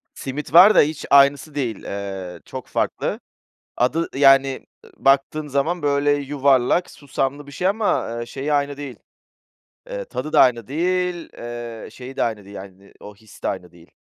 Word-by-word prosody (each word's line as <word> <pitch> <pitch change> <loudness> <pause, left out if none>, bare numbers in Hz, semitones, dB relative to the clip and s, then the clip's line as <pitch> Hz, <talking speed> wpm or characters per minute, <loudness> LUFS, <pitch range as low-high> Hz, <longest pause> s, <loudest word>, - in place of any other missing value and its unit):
Simit 135 +1 -6
var 190 +5 +9
da - - +8
hiç 150 +1 -2
aynısı 140 +2 +4
değil. 120 -7 -3
Eee, 95 -2 -6
çok - - -8
farklı. - - -2 0.6
Adı, 160 +7 +1
yani, 135 -1 +4 0.2
ı - - -18
baktığın 140 +3 +2
zaman 155 +6 -1
böyle 145 0 +2
yuvarlak, 140 +2 +1
susamlı 140 0 -4
bir 140 - -12
şey 180 +6 0
ama, 210 +1 0
ııı, 120 0 -5
şeyi 140 +4 -4
aynı 145 -1 0
değil, 140 -3 -7 0.9
eee, - - -5
tadı 155 - -6
da - - +7
aynı 120 -4 +3
değil, 180 +3 -1
ııı, 120 -1 -7
şeyi 130 +1 -10
de - - 0
aynı 110 -3 -3
değil, 100 +1 -12
yani, 95 0 -12
o 105 0 -11
his 110 +1 -18
de - - 0
aynı 90 -2 -4
değil. 85 -1 -19
140 Hz, 170 wpm, -21 LUFS, 120-150 Hz, 0.9 s, var